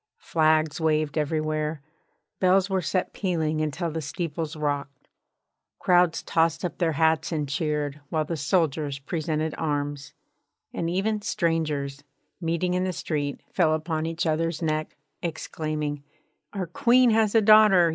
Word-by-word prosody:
Flags 155 0 +1
waved 155 -2 +1
everywhere, 155 -1 -1 0.6
bells 190 +1 +3
were 190 -1 +1
set 180 +2 -1
pealing 160 -5 -1
until 160 +2 -2
the 160 +1 -3
steeples 160 +1 -4
rocked, 145 -3 -3 0.7
crowds 175 -2 +3
tossed 165 +1 +1
up 175 - -5
their 165 -3 +1
hats 160 +2 +2
and 150 -3 -1
cheered, 145 0 -2
while 155 -1 0
the 165 - -3
soldiers 150 -2 0
presented 155 +1 -2
arms, 145 -2 -3 0.6
and 165 - -2
even 205 +4 0
strangers 155 -8 -1 0.4
meeting 170 +2 0
in 180 0 +1
the 185 0 -1
street 145 -4 -3
fell 160 -4 +3
upon 160 0 -2
each 165 +2 -2
other's 165 0 0
neck, 155 -2 -2 0.2
exclaiming: 155 -3 -3 0.5
'Our 195 -3 -3
Queen 240 +8 +4
has 220 -1 +2
a - - +8
daughter! 210 -5 +7
160 Hz, 135 wpm, -26 LUFS, 150-175 Hz, 0.7 s, a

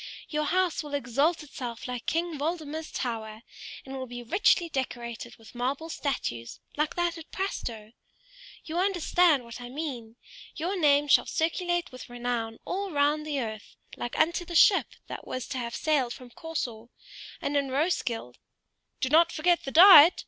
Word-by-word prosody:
Your 300 -1 -1
house 365 0 +1
will 295 -2 -5
exalt 285 +5 +1
itself 245 -5 -7
like 250 -1 -5
King 330 -2 -1
Waldemar's 315 0 -3
tower, 220 -2 -4 0.4
and 270 0 -7
will 260 -1 -5
be 245 0 -7
richly 355 - +3
decorated 240 -5 -5
with 225 - -16
marble 270 +6 -2
statues, 180 - -3 0.2
like 300 +1 -1
that 345 -1 -1
at 325 - -12
Prastoe. 230 - -4 0.7
You 330 +2 -2
understand 350 -6 +3
what 235 +1 -9
I 245 - -7
mean. 250 -6 -6 0.4
Your 345 +5 -2
name 295 -4 +4
shall - - +5
circulate 350 +1 -1
with 255 -1 -10
renown 240 -2 -3
all 390 +2 -3
round 300 0 +1
the 290 -2 -1
earth, 220 -2 -7 0.2
like 240 - -5
unto 340 +2 +2
the 345 0 -7
ship 385 +4 +6 0.2
that - - -8
was 255 -1 -4
to 260 - -3
have 235 -1 -4
sailed 275 -6 +1
from 250 -1 -12
Corsor; 240 -8 -5 0.5
and 290 - -2
in 280 -1 +1
Roeskilde 260 - -1 0.3
" - - -52
"Do 260 - +1
not 330 +3 +5
forget 345 +2 +1
the 270 - -4
diet!" 345 -1 +9
285 Hz, 165 wpm, -28 LUFS, 245-330 Hz, 0.7 s, diet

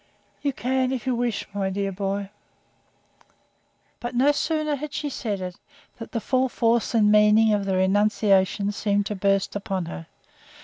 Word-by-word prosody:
"You 285 -1 0
can, 260 0 -1
if 255 -4 -3
you 260 - +1
wish, 235 -3 -1
my 195 -1 -1
dear 195 +1 -2
boy." 195 +1 -3 1.7
But 240 +1 -5
no 270 +4 +4
sooner 305 0 -1
had 290 +1 -7
she 300 -2 -3
said 210 -7 -3
it, 180 -1 -6 0.4
than 225 - -7
the 230 - -1
full 255 +3 +1
force 235 0 +1
and 210 -2 +4
meaning 210 +1 +5
of 205 -1 0
the 190 -1 0
renunciation 200 +1 +2
seemed 205 0 0
to 210 - -3
burst 195 0 0
upon 195 -3 -3
her. 80 - -8
210 Hz, 165 wpm, -24 LUFS, 195-250 Hz, 1.7 s, meaning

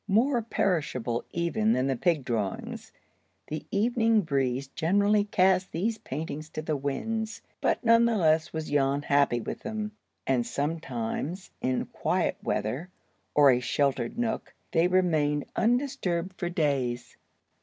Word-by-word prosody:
More 235 +5 +3
perishable 150 - -1
even 215 +6 +1
than 130 - +1
the 135 -1 +1
pig 155 0 +1
drawings, 105 -6 -3 0.5
the 155 0 -6
evening 225 +1 +3
breeze 135 -5 -1
generally 205 +7 +2
cast 185 -2 +2
these 215 +7 -1
paintings 155 +2 -5
to 155 - -5
the 155 -1 -1
winds, 215 +12 -3 0.2
but - - +1
none 230 0 +6
the 235 -2 +2
less 160 -3 +3
was 160 -2 -4
Jan 140 0 +2
happy 140 -4 +3
with - - -5
them, 215 -1 -4 0.3
and 130 -2 +2
sometimes 145 - -3
in 130 0 0
quiet - - 0
weather, 125 - -2 0.5
or 145 -2 +7
a 125 - +3
sheltered 135 - 0
nook, 235 -2 -2 0.2
they 165 0 +3
remained 155 -6 +2
undisturbed 205 -8 0
for 175 -2 -3
days. 135 -8 -1
160 Hz, 135 wpm, -28 LUFS, 135-205 Hz, 0.5 s, or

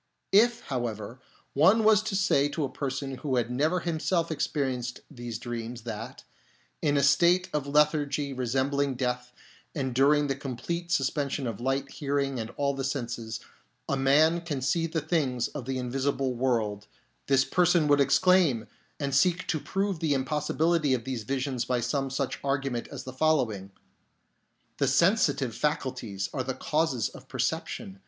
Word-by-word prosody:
If, 235 +4 +4
however, 120 -2 -4 0.3
one 190 +10 +5
was 215 -1 +6
to 215 -2 -3
say 145 -7 +3
to 150 +1 -2
a 135 - -2
person 135 -1 -4
who 135 -1 -2
had 120 -1 0
never 155 +8 +1
himself 170 0 0
experienced 130 -5 -2
these 120 -4 -6
dreams 120 0 -6
that, 115 -1 -7 0.6
in 145 -1 +2
a 140 - +2
state 170 +6 +4
of 145 -2 -1
lethargy 145 -1 +2
resembling 135 +2 0
death 125 -1 -2 0.4
and 130 -4 -2
during 145 +3 +4
the 140 - 0
complete 170 +6 -4
suspension 140 -2 0
of 115 -3 -4
sight, 135 +2 -1
hearing, 140 -2 -1
and 110 0 -4
all 140 -1 +1
the 135 0 -4
senses, 120 -4 -3 0.5
a - - 0
man 150 +5 +4
can 160 -5 -3
see 165 +6 +1
the 160 0 -2
things 140 -6 0
of 140 -5 -7
the 130 0 -2
invisible 130 +1 -1
world, 110 -5 -1 0.4
this 135 -1 +4
person 175 0 +3
would 145 -1 +4
exclaim, 150 -4 +4 0.3
and 140 -2 -2
seek 175 +6 +3
to 155 - +1
prove 195 +2 -2
the 155 -3 +1
impossibility 150 +2 +1
of 120 - -5
these 130 -1 -3
visions 130 -1 -1
by 125 -1 0
some 135 +3 -1
such 135 0 -2
argument 135 -3 -1
as - - -8
the 130 - -8
following: 130 -10 +1 0.5
" - - -45
The 140 - +2
sensitive 145 - +3
faculties 130 -10 -2
are 135 - -1
the 130 0 -3
causes 150 -7 0
of - - -14
perception. 95 0 -3
135 Hz, 160 wpm, -28 LUFS, 125-155 Hz, 0.6 s, was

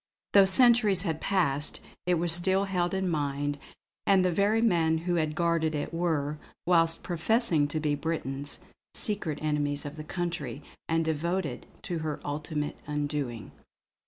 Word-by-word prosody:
Though 200 -1 +8
centuries 210 -2 +5
had 160 -5 -2
passed, 150 -7 0 0.3
it 180 - +4
was 170 0 +3
still 190 +3 +4
held 180 -2 -1
in 190 -1 0
mind; 145 -3 -1 0.5
and 190 -2 +5
the 180 - +2
very 200 +5 +2
men 170 -8 +3
who 175 - +1
had 155 -1 -2
guarded 165 -2 +1
it 145 +2 -3
were, 155 -3 -1 0.3
whilst 165 -1 +3
professing 175 - +2
to 155 +2 -2
be 150 -1 0
Britons, 145 -2 -3 0.4
secret 190 -8 -3
enemies 145 -1 -1
of 145 +2 -7
the 155 - -6
country, 155 -6 -4 0.3
and 165 0 +1
devoted 160 -2 -2 0.2
to 170 -2 -3
her 155 -1 -3
ultimate 150 0 -3
undoing. 145 -6 -3
160 Hz, 150 wpm, -28 LUFS, 150-180 Hz, 0.5 s, Though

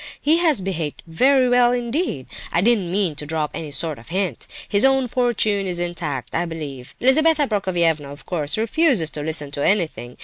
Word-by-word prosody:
He 310 +3 +3
has 315 - +3
behaved 170 -6 -4
very 255 +10 +3
well 245 0 +4
indeed. 245 - -2 0.3
I 170 - +2
didn't 210 -4 +2
mean 190 -4 0
to 150 - -4
drop 155 -1 -2
any 155 - -5
sort 145 0 -1
of 115 - -16
hint. 185 - -2 0.2
His 200 0 +2
own 270 -1 +4
fortune 220 -5 0
is 180 -1 -1
intact, 170 -7 -4
I 175 - 0
believe. 145 -6 -7
Lizabetha 300 +3 +3
Prokofievna, 170 - 0
of 145 - -12
course, 155 -2 -1
refuses 225 - +2
to 150 - -5
listen 150 -2 -4
to 145 0 -3
anything. 160 -11 0
180 Hz, 180 wpm, -21 LUFS, 155-245 Hz, 0.3 s, well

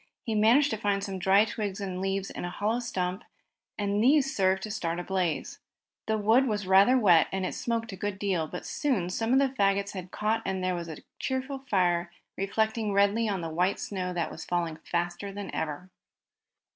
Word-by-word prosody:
He 225 - -2
managed 235 +7 +4
to 220 - -1
find 200 -2 0
some 195 -2 -4
dry 195 +3 +5
twigs 210 -2 -4
and 190 -2 -4
leaves 195 0 -2
in - - -6
a 175 - -3
hollow 210 +6 -1
stump, 185 -4 -3 0.5
and 205 +1 0
these 270 +1 +4
served 190 0 +2
to 215 - -4
start 170 -5 -2
a - - -4
blaze. 185 -3 -2 0.5
The 220 0 +1
wood 225 +6 +4
was 210 -3 -1
rather 195 +7 +6
wet, 180 -9 +5
and 190 -1 -1
it - - -3
smoked 230 -2 -2
a - - -6
good 205 +1 -3
deal, 190 -6 -1
but 180 - -7
soon 215 - -1
some 225 +5 -1
of 260 - +5
the 275 0 +3
fagots 200 -3 +1
had 185 -2 -7
caught 215 +3 -1
and 190 -1 -2
there 185 0 +1
was 170 -1 -4
a 160 - -8 0.2
cheerful 265 +1 -2
fire 175 -3 +2 0.2
reflecting 220 +2 0
redly 200 +3 +3
on 195 -3 -1
the 165 - -4
white 180 +4 +1
snow 185 -3 -3
that 170 -2 -2
was 160 - -8
falling 170 -3 -2
faster 175 +4 -3
than 200 0 -7
ever. 160 +4 -4
195 Hz, 205 wpm, -28 LUFS, 180-220 Hz, 0.5 s, rather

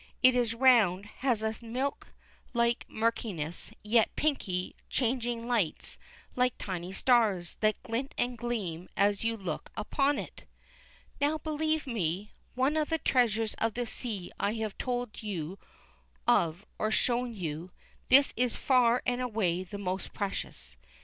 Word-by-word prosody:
It 255 0 +8
is 240 -2 +1
round, 225 -7 +5
has 245 -5 +1
a 220 +2 -2
milk 255 +5 -2 0.5
like 235 0 +2
murkiness, 210 -8 -1
yet 220 +1 +4
pinky, 190 -12 -1
changing 240 -2 0
lights 225 -10 0 0.4
like 250 -1 +2
tiny 180 -2 -4
stars, 210 -6 +3
that 215 -1 +1
glint 245 +4 -3
and 245 0 0
gleam 210 -8 -3
as 200 +1 +3
you 230 0 0
look 180 -7 -4
upon 275 +6 +1
it. - - -7 0.7
Now 290 +2 +2
believe 310 0 -1
me! 200 - -2 0.3
Of 265 +3 +3
all 310 - +3
the 325 +2 0
treasures 225 -6 +2
of 225 -1 0
the 245 0 -1
sea 215 -6 -5
I 205 - +1
have 220 -2 -3
told 245 -3 -2
you 190 -4 -4 0.7
of 170 +4 +3
or 215 - +1
shown 240 +1 +1
you, 165 -2 -4 0.4
this 275 +2 +7
is 245 0 +1
far 250 -3 +3
and 250 0 0
away 205 -8 0
the 195 +2 -7
most 190 -1 -3
precious. 200 -2 -4
230 Hz, 145 wpm, -30 LUFS, 200-250 Hz, 0.7 s, It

